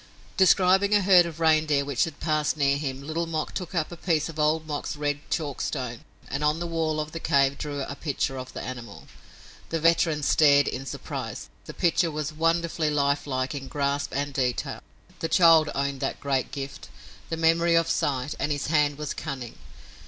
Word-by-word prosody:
Describing 190 +2 +4
a 205 - +3
herd 180 -2 +6
of 165 -1 -9
reindeer 155 -3 +3
which 140 -3 +1
had 160 -3 -9
passed 155 -1 0
near 140 -1 +3
him, 140 -2 -4
Little 165 +3 -2
Mok 155 -2 -3
took 180 -1 -5
up 165 -1 -1
a - - -6
piece 165 -2 0
of 160 -1 -8
Old 155 +1 +2
Mok's 150 -1 -4
red 145 -1 -1
chalkstone 135 -5 -3 0.3
and 140 +2 -3
on 150 +1 +2
the 175 - -3
wall 160 -2 -1
of 155 0 -4
the 165 - -5
cave 140 -2 +2
drew 145 -1 -4
a 140 - -5
picture 140 -2 -2
of 130 0 -8
the - - -5
animal. 120 -5 -8 0.6
The 165 - -1
veteran 160 -2 +2
stared 145 -1 +5
in 135 +1 -4
surprise. - - -6 0.2
The - - -9
picture 170 0 +2
was 155 0 -4
wonderfully 165 0 0
life 145 -1 0
like 130 0 -2
in 135 -2 -6
grasp 140 0 -1
and 145 +1 -2
detail. 125 -3 -2 0.4
The 165 - -2
child 165 -4 +6
owned 140 0 -1
that - - -3
great 135 -2 -1
gift, 135 -1 -7 0.4
the 165 - -2
memory 165 +1 +3
of 165 -1 +3
sight, 140 -3 -1
and 150 - -1
his 145 -1 -2
hand 145 -2 +2
was 150 -1 -4
cunning. 135 -6 -6
150 Hz, 190 wpm, -26 LUFS, 140-165 Hz, 0.6 s, herd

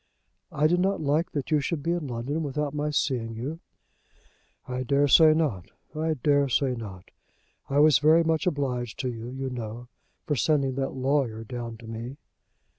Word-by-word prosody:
"I 150 - +1
did 175 +3 +3
not 195 +2 +1
like 155 +4 0
that 145 +1 -3
you 155 - +4
should 145 0 -3
be 170 - 0
in 170 -4 -2
London 130 +6 -3
without 150 0 -2
my 150 0 -1
seeing 125 -6 -1
you." 140 +8 -5 1.1
"I 125 0 -3
daresay 145 +4 +5
not. 110 - -1 0.3
I 160 +1 0
daresay 140 -1 +2
not. 100 -7 -8 0.6
I 140 - 0
was 150 -3 +6
very 160 +3 +5
much 160 +3 0
obliged 125 -7 -2
to 130 -2 -2
you, 115 0 -7
you 130 +1 -4
know, 120 0 -6 0.4
for 150 - 0
sending 140 +1 +1
that 135 +1 -3
lawyer 130 -4 0
down 115 0 -6
to 115 - -13
me." 115 +4 -6
140 Hz, 170 wpm, -26 LUFS, 120-150 Hz, 1.1 s, was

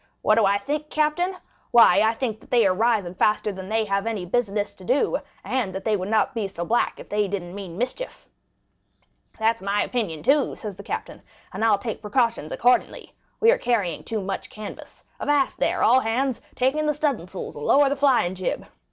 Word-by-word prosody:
'What 215 - +4
do 220 -1 +4
I 200 +1 +3
think, 295 +8 -3
captain? 310 +5 0 0.3
Why 230 -6 +6
I 220 +1 +3
think 225 -3 -3
that - - -20
they 240 -4 +4
are 190 - +4
rising 210 -3 +1
faster 210 +2 +1
than 190 -1 -8
they 220 0 +1
have 200 +1 -1
any 215 -5 -2
business 205 0 -1
to 190 - -15
do, 280 - +1 0.2
and 230 -8 -2
that 190 - -5
they 220 -2 +2
would 190 0 -3
not 220 +4 +2
be 220 -4 -2
so 175 -3 -5
black 235 +6 0
if - - -10
they 210 0 0
didn't 180 -3 -5
mean 190 -4 -7
mischief.'—'That's 230 - -6
my 200 +1 +1
opinion 200 -11 -3
too,' 280 0 +2
said 210 -4 -7
the - - -8
captain, - - -6 0.3
'and - - -3
I'll 225 -2 +4
take 215 +2 -5
precautions 230 - 0
accordingly. 250 +1 +1 0.3
We 455 +1 +6
are - - +1
carrying 205 -9 0
too 220 -2 -3
much 195 0 -4
canvas. 215 -1 -10 0.2
Avast, 290 -2 +1
there, - - +1
all 250 +3 +6
hands! 255 +2 -1
Take 260 +3 +1
in 305 0 0
the 300 - +1
studding 280 - -1
sails 185 0 -7
and 145 - -7
stow 285 0 +5
the 280 - 0
flying 265 -10 +3
jib. 185 -1 -3
220 Hz, 205 wpm, -24 LUFS, 195-260 Hz, 0.3 s, Why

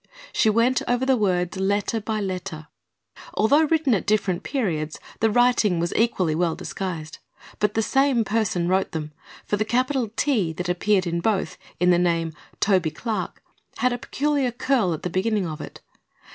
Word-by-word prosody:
She 220 - +3
went 230 +4 +3
over 245 +1 +1
the 265 0 +4
words 185 -4 0
letter 205 +3 0
by 215 0 -2
letter. 180 -5 -5 0.7
Although 285 +9 +4
written 305 -4 +2
at 195 - -1
different 200 -4 +1
periods 160 - -2 0.2
the 225 - +3
writing 230 -5 +3
was 170 +1 -1
equally 190 -8 +2
well 165 0 0
disguised. 165 -5 -5 0.4
But 210 0 +1
the 225 - +2
same 270 -2 +2
person 205 -6 0
wrote 190 +2 +1
them, 155 -2 -4 0.3
for 205 - 0
the 215 - +1
capital 255 +1 0
"T" 225 - +1
that 180 +3 -4
appeared 190 +2 +2
in 170 0 -1
both, 190 -4 0 0.2
in 180 0 +4
the 175 - +4
name 165 -2 +1 0.3
"Toby 185 -5 +2
Clark," 215 +8 -4 0.3
had 250 0 +2
a 245 - -4
peculiar 285 -1 0
curl 240 -5 +1
at - - -11
the 180 - -1
beginning 205 +1 0
of 155 -2 -5
it. - - -9
205 Hz, 175 wpm, -24 LUFS, 175-240 Hz, 0.7 s, the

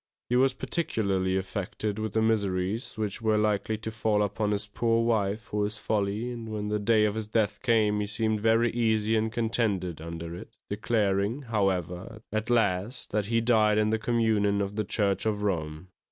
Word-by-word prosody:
He 125 - +2
was 130 +1 +3
particularly 95 - 0
affected 100 +2 -3
with 110 -1 -3
the 110 - +2
miseries 100 0 0
which 105 0 -3
were 110 -1 +2
likely 105 0 +1
to 110 +1 -5
fall 110 -1 +1
upon 105 +1 -1
his 105 0 -1
poor 115 +2 +1
wife 105 -2 +1
for 105 -1 -2
his 105 +1 -2
folly, 105 +3 -1
and 115 -2 -7
when 105 -1 -3
the 105 0 0
day 105 +1 +3
of 105 - +1
his 110 -1 -4
death 105 -2 0
came, 110 -4 +2
he 105 - -1
seemed 110 +1 0
very 115 +1 +3
easy 110 -2 +1
and 110 0 +1
contented 110 -8 -1
under 85 +1 -6
it, - - -9 0.2
declaring, 105 +3 0
however, 95 -1 -2
at 110 +1 -2
last 110 -1 0
that 105 -1 0
he 115 +1 +2
died 110 -3 +3
in 110 0 +2
the 110 - +1
communion 110 -3 +1
of 100 0 -2
the 110 - 0
Church 100 +1 0
of 105 -1 -1
Rome. 80 -3 -2
105 Hz, 185 wpm, -28 LUFS, 100-110 Hz, 0.2 s, was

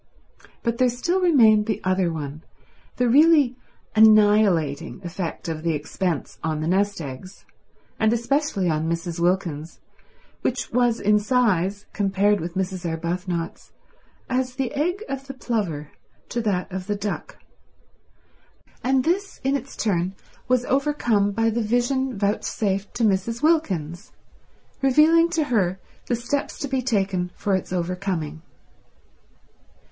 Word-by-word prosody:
But 235 -1 -1
there 255 -1 +4
still 345 +10 -1
remained 225 -11 +5
the 215 - -1
other 185 -2 +1
one, 150 -1 -6 0.5
the 250 - +1
really 290 0 +5 0.4
annihilating 205 -8 +4
effect 175 -1 -5
of 160 -1 -3
the 165 -1 0
expense 155 +2 -3
on 160 -1 -1
the 155 - -2
nest 200 +2 +1
eggs, 145 +7 -9 0.5
and 220 0 +3
especially 235 -4 0
on 160 0 0
Mrs. 170 0 -3
Wilkins's, 170 -3 -1 0.6
which 255 - -2
was 240 -1 +2
in 210 +1 +3
size, 205 -4 +1
compared 200 0 +2
with 170 +2 -5
Mrs. 185 -1 -2
Arbuthnot's, 170 +1 -4 0.5
as 255 -1 -1
the 260 -2 -2
egg 355 +8 -1
of 275 0 -5
the 270 - -7
plover 185 - -2 0.4
to 240 - -2
that 195 -4 -1
of 185 0 -5
the 205 - 0
duck; 205 0 -5 1.5
and 260 0 +2
this 390 +6 -1
in 270 +1 +1
its 275 0 -5
turn 185 -3 0 0.3
was 250 -1 +2
overcome 250 -7 +1
by 225 +2 +1
the 235 +2 -1
vision 245 +2 0
vouchsafed 200 0 -1
to 235 - -1
Mrs. 215 +4 0
Wilkins, 185 - 0 0.7
revealing 310 +5 +5
to 330 -2 +1
her 195 -9 0 0.3
the 245 - +1
steps 240 +5 -3
to 280 - -4
be 265 -1 -1
taken 195 -7 0
for 200 - -1
its 185 - -4
overcoming. 180 -3 -3
205 Hz, 135 wpm, -23 LUFS, 180-250 Hz, 1.5 s, remained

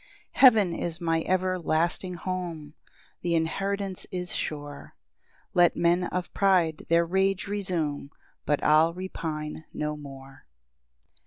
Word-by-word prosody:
4 - - -11
Heaven 220 -9 +7
is 170 0 -3
my 165 -2 0
everlasting 180 -1 0
home, 170 -4 -5 0.5
Th' 170 -1 0
inheritance 195 +4 -2
is 180 -1 -4
sure; 145 -1 -5 0.6
Let 175 -1 +4
men 175 +1 +2
of 180 0 -4
pride 180 -5 +2
their 170 0 +4
rage 190 +2 +1
resume, 175 -9 -2 0.4
But 145 - +1
I'll 160 +2 +4
repine 160 -4 -5
no 150 0 -3
more. 135 - -12
170 Hz, 115 wpm, -27 LUFS, 155-185 Hz, 0.6 s, Heaven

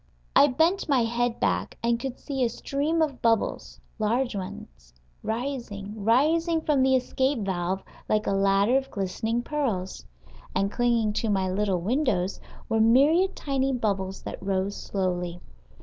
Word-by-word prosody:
I 285 - +8
bent 320 +7 +1
my 265 -4 +4
head 235 +1 -1
back, - - -1
and 235 0 +2
could 260 0 -5
see 270 -3 -2
a 240 - +2
stream 290 +7 0
of 280 -5 -3
bubbles, 225 -2 0 0.2
large 235 +3 0
ones, - - -8 0.3
rising, 225 -4 -4
rising 320 - +3
from 295 -4 +2
the 265 0 +4
escape 260 0 0
valve 190 0 -2 0.3
like 215 0 +2
a - - 0
ladder 195 +5 +3
of 270 0 -3
glistening 220 +4 -2
pearls. 225 - -2 0.5
And 195 +1 +1
clinging 235 -3 +1
to 220 +1 -1
my 190 -2 +1
little 190 -2 0
windows 205 - 0 0.3
were 225 -2 +1
myriad 295 - +4
tiny 270 -1 -1
bubbles 195 -6 -2
that - - -7
rose 195 +1 -1
slowly. 180 -3 -2
230 Hz, 150 wpm, -26 LUFS, 195-270 Hz, 0.5 s, I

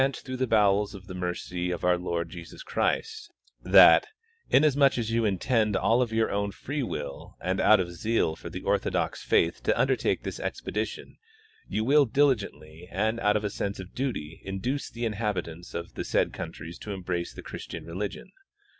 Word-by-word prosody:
219 135 0 0
through 130 0 -4
the 130 0 0
bowels 105 -1 +3
of 95 -1 -11
the 95 - -8
mercy 90 0 -3
of 90 -1 -3
our 90 0 +4
Lord 85 -1 -2
Jesus 85 -2 -9
Christ, 440 -1 -1 0.3
that, - - +7 0.4
inasmuch 140 -1 +4
as 115 -2 -1
you 115 0 +2
intend 105 +2 +1
of 115 +4 +2
your 110 0 +2
OAvn 100 0 -1
free 145 +2 -3
will 90 - -5
and 95 +1 -1
out 110 - +6
of 90 -2 -2
zeal 85 -3 0
for - - -9
the - - -7
orthodox - - 0
faith 85 - +2
to - - +1
undertake - - +1
this - - -5
expedition, 110 +1 -4 0.5
you 110 - -1
will 140 +4 +5
diligently 105 - 0
and 110 +3 0
out 105 -1 +3
of 105 - -4
a 105 - -1
sense 100 0 -3
of 95 0 -9
duty 110 - -4
induce 100 +9 -3
the 115 0 -4
inhabitants 95 -6 -3
of 85 0 -5
the - - -4
said - - +1
countries 85 +2 -7
to 105 - -5
embrace 90 -2 -3
the - - -10
Christian - - -7
religion. 95 +5 -5
105 Hz, 180 wpm, -27 LUFS, 90-115 Hz, 0.5 s, that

